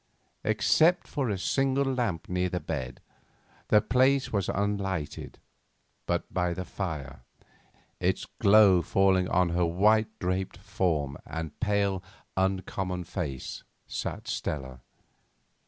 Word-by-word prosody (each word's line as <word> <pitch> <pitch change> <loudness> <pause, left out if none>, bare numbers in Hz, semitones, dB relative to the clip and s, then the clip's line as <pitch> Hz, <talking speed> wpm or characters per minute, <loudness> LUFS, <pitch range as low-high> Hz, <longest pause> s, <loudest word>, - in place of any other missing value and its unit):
Except 110 - +3
for 135 -5 -2
a 100 - -1
single 135 +7 +1
lamp 120 -11 -1
near 90 0 0
the 90 - -2
bed, 65 -7 -5 0.7
the 105 - +5
place 130 +1 +2
was 100 -3 0
unlighted, 100 -6 -2 0.7
but - - -2
by 90 -1 0
the 90 - -4
fire, 75 -11 -5 0.8
its - - 0
glow 100 -3 +6
falling 95 0 +3
on 90 -1 +3
her 85 +1 +1
white 105 +6 +3
draped 90 +1 -2
form 75 -7 -1
and 80 0 -6
pale, 100 -3 +1 0.3
uncommon 95 -1 -1
face, 75 -8 -5 0.2
sat - - -5
Stella. 65 -4 -4
95 Hz, 115 wpm, -28 LUFS, 85-105 Hz, 0.8 s, glow